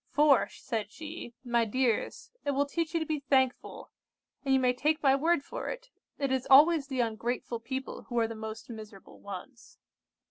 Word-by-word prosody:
'For,' 290 -2 +4
said 220 -4 -4
she, 305 -5 -8
'my 240 -2 +2
dears, 240 0 -1
it 285 -1 -1
will 285 +1 +2
teach 330 +3 -3
you - - +3
to 320 - -2
be 310 -1 -1
thankful; 265 -2 0 0.5
and 275 - -1
you 265 - +5
may 250 -1 +3
take 305 +5 0
my 270 -1 +5
word 320 +1 +2
for - - -5
it, - - -7 0.3
it 275 -2 -1
is 265 -1 0
always 295 +2 +7
the 260 -2 0
ungrateful 235 +1 -2
people 260 +3 -5
who 240 - -3
are 230 -1 +3
the 230 - -6
most 220 0 -7
miserable 215 -4 -11
ones. 200 +6 -10
265 Hz, 185 wpm, -30 LUFS, 235-290 Hz, 0.5 s, always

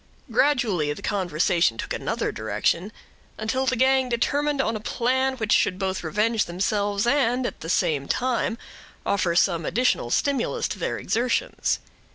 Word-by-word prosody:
Gradually, 225 - +2
the - - -11
conversation 175 - +1
took - - -4
another - - -2
direction, 110 - -1 0.5
until 255 +5 -1
the 255 - +2
gang 260 +1 +3
determined 285 +4 0
on 230 -4 +1
a - - -3
plan 260 +4 0
which 220 -3 -2
should 185 - +3
both 190 -1 -2
revenge 210 +6 +1
themselves, 200 +3 -1
and 250 -1 +2
at - - -4
the 165 - -7
same 145 -5 +1
time 245 -2 0 0.5
offer 185 -4 +1
some 170 -2 +2
additional 240 - +1
stimulus 275 - 0
to - - -5
their - - -2
exertions. 250 - 0
220 Hz, 150 wpm, -24 LUFS, 175-255 Hz, 0.5 s, gang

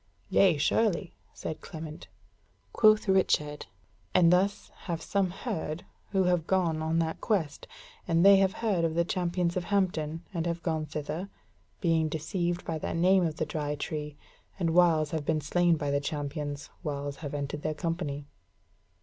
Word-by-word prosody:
"Yea, 185 -6 +5
surely," 190 +2 +1 0.2
said 160 - -6
Clement. 155 0 -8 0.7
Quoth 215 0 +5
Richard: 150 -6 +1 0.5
"And 175 -1 +6
thus 200 +3 +1 0.2
have 170 -1 -1
some 195 +2 0
heard, 175 -5 -4 0.2
who 195 -2 +2
have 180 -3 +1
gone 170 -4 +1
on 160 +1 0
that 165 -1 -1
quest, 170 -9 -1 0.4
and 165 +1 +3
they 200 0 +9
have 190 -1 +3
heard 190 -6 +2
of 165 -1 0
the 170 0 +2
Champions 175 -1 -1
of 180 -1 -2
Hampton, 170 -5 0
and 170 -1 -1
have 170 0 -3
gone 160 -2 -1
thither, 155 +5 -4 0.5
being 165 -3 +2
deceived 170 +3 -2
by 160 -1 -2
that - - -3
name 185 +2 +4
of 160 -3 -1
the 160 - 0
Dry 150 -1 -3
Tree, 150 0 -5 0.4
and 170 -4 0
whiles 165 -4 +4
have 160 -2 -2
been 155 +1 +1
slain 170 +3 +2
by 145 -2 -2
the 140 0 +1
champions, 145 0 -4
whiles 145 -1 -4
have 145 -2 -6
entered 145 +1 -3
their 155 0 -2
company." 160 -4 -3
165 Hz, 165 wpm, -29 LUFS, 150-180 Hz, 0.7 s, they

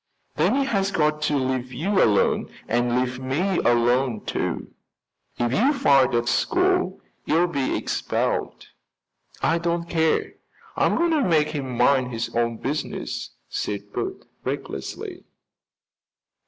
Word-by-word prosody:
"Then - - +2
he 275 0 +2
has 195 -7 +1
got 150 -4 +1
to 145 - +1
leave 130 -1 -1
you 185 +10 +1
alone 105 -3 +2 0.2
and 120 +1 +1
leave 125 0 -2
me 160 +9 0
alone, 120 0 +2
too." - - -3 0.6
"If 120 0 0
you 265 - +3
fight 140 - +4
at 120 0 +1
school, 365 - +1 0.3
you'll 170 +3 +3
be 140 -7 -1
expelled." - - -2 0.7
"I 165 +1 +3
don't 170 0 -1
care, 160 -2 +1 0.4
I'm - - +2
going 340 0 +2
to 310 -2 +3
make 155 - +3
him 135 -5 -4
mind 125 0 +3
his 115 +1 -4
own 115 -1 +1
business," 145 +4 -4 0.2
said 100 0 -4
Bert - - -4 0.2
recklessly. 65 -1 -5
140 Hz, 130 wpm, -24 LUFS, 120-175 Hz, 0.7 s, fight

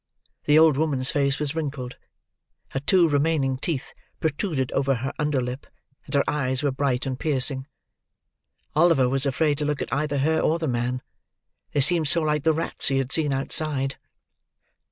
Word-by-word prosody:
The 150 +1 +5
old 160 -3 +6
woman's 140 -4 0
face 140 -1 +1
was 150 -1 -2
wrinkled; 140 -6 -4 0.8
her 135 - -2
two 170 +5 +4
remaining 145 -3 +1
teeth 140 -3 -3 0.3
protruded 150 -4 -1
over 135 0 +1
her 130 +3 -4
under 150 -3 +1
lip; 125 +2 -5 0.4
and 140 - -4
her 140 - +4
eyes 130 -2 -1
were 145 - +2
bright 135 -1 -1
and 130 -1 -3
piercing. 135 -2 0 1.1
Oliver 155 -5 +4
was 135 +2 0
afraid 145 +2 +1
to 150 - -1
look 150 -1 -1
at - - -4
either 145 +1 0
her 160 +4 +2
or 160 - +2
the 165 -2 -2
man. 125 0 -1 0.7
They 145 - +2
seemed 160 +2 +2
so 165 +3 +2
like 150 -1 +1
the 160 - +5
rats 160 +1 -1
he 135 - +2
had 135 0 -1
seen 150 -2 +1
outside. 135 0 -1
140 Hz, 175 wpm, -24 LUFS, 135-155 Hz, 1.1 s, old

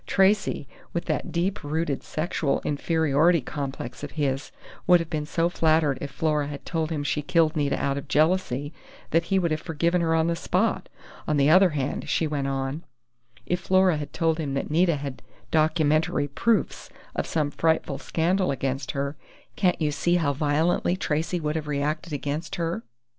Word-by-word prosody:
Tracey, 195 -7 +2 0.3
with 170 - -2
that - - -2
deep 180 +3 -1
rooted 150 -1 -1
sexual 155 -2 -1
inferiority 160 +2 +2
complex 135 -1 -6
of 145 - -6
his, 140 -2 -1 0.4
would 180 0 +7
have 165 -1 -5
been 150 -2 -2
so 165 +1 +1
flattered 160 -5 +2
if 145 - -4
Flora 150 -2 0
had 145 -1 -7
told 160 -2 -1
him 150 -3 -2
she 150 +1 -1
killed 165 0 +2
Nita 145 -2 0
out 140 0 0
of - - -11
jealousy 155 -3 +1 0.4
that 165 +1 +3
he 195 - +1
would 170 -3 +1
have 155 0 -1
forgiven 170 +2 0
her 165 -1 +2
on 160 0 +3
the 170 0 +1
spot. 190 +6 0 0.4
On 150 - +1
the 140 +2 +4
other 185 +2 +7
hand," 140 0 -3
she 165 - +1
went 145 -3 -2
on, 135 +3 -2 0.6
"if 180 - 0
Flora 185 -2 +3
had 145 -1 -5
told 165 -1 0
him 140 -3 -2
that 140 - -3
Nita 170 +1 +3
had 140 -2 -6 0.3
documentary 155 -2 +2
proofs 220 +11 0 0.3
of - - -1
some 150 -3 0
frightful 160 +1 0
scandal 180 +3 0
against 135 0 -2
her, 140 +1 -2 0.4
can't 180 -3 +2
you 155 -2 +1
see 175 +4 +1
how 155 -5 +1
violently 155 +5 +1
Tracey 165 0 -1
would 150 -1 -2
have 155 -2 -3
reacted 150 +3 -2
against 145 +3 -3
her?... 165 -7 -2
155 Hz, 180 wpm, -25 LUFS, 145-170 Hz, 0.6 s, would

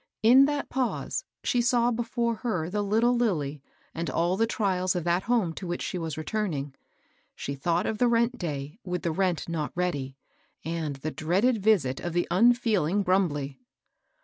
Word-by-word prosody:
In 255 +5 +8
that 290 0 -1
pause, 265 - -2 0.2
she 245 - +2
saw 240 0 +3
before 235 0 -1
her 180 -9 -2
the 210 +1 0
little 225 +4 +2
Lilly 155 - 0 0.3
and 165 0 -3
all 175 +2 +1
the 225 +3 +2
trials 185 -5 0
of 175 - -1
that 175 +2 +1
home 220 -9 +2
to 185 - -7
which 175 0 -3
she 180 - -3
was 160 -3 -4
returning. 155 -5 -2 0.6
She 140 - -4
thought 170 +5 0
of 215 - -2
the 245 - +4
rent 235 +1 +2
day 150 - -5
with 180 -1 -3
the 170 - 0
rent 180 0 0
not 160 -3 -2
ready, 145 -7 -2 0.5
and 160 -3 -2
the 150 +4 -4
dreaded 195 +11 +1
visit 190 -12 +2
of 175 - -4
the 175 0 +1
unfeeling 205 -3 +3
Brumbley. 150 -8 0
180 Hz, 175 wpm, -27 LUFS, 160-230 Hz, 0.6 s, In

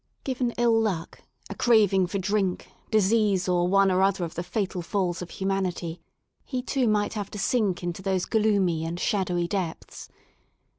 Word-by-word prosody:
Given 255 -2 -1
ill 235 -1 +3
luck, 185 -7 -3 0.3
a - - -6
craving 205 -6 +3
for 200 - -3
drink, 195 -1 -1 0.2
disease 210 -2 +2
or 175 -1 +2
one 195 +1 +4
or 185 +1 +2
other 195 -1 +2
of 165 - -8
the 175 - -3
fatal 180 0 -3
falls 180 0 -1
of 175 - -6
humanity, 185 -3 -2 0.4
he 255 -2 -4
too 260 -1 0
might 210 -1 +1
have 205 -3 -4
to - - -8
sink 200 -4 0
into 175 +1 -4
those 190 -1 0
gloomy 200 -7 +1
and 165 +2 -4
shadowy 180 -5 0
depths. 180 -4 -5
195 Hz, 165 wpm, -26 LUFS, 180-215 Hz, 0.4 s, one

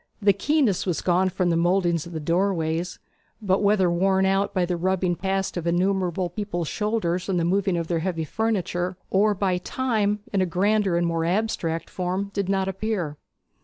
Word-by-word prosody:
The 200 -2 +4
keenness 235 - +1
was 175 - 0
gone 185 +1 +2
from 180 -1 0
the - - +2
mouldings 175 -1 +1
of - - -10
the 160 - -4
doorways, 170 0 0 0.4
but 195 -3 +1
whether 200 -3 +3
worn 190 +2 +2
out 195 +1 +1
by 185 -3 +1
the 175 0 -1
rubbing 180 0 0
past 195 0 -2
of 170 -1 -3
innumerable 180 0 +1
people's 175 -4 -3
shoulders, 200 -4 -1
and 180 -2 +1
the 165 - +1
moving 190 0 +1
of 170 - -1
their 165 0 -1
heavy 165 -1 -2
furniture, 185 -3 -1
or 205 +2 +3
by 185 -2 0
Time 210 -2 -1
in 195 - +2
a 185 - +1
grander 195 +1 +1
and 175 - +1
more 165 -1 0
abstract 175 -3 -1
form, 185 +2 -3
did 200 -2 -2
not 190 -1 +1
appear. 195 -6 -2
185 Hz, 185 wpm, -24 LUFS, 175-200 Hz, 0.4 s, The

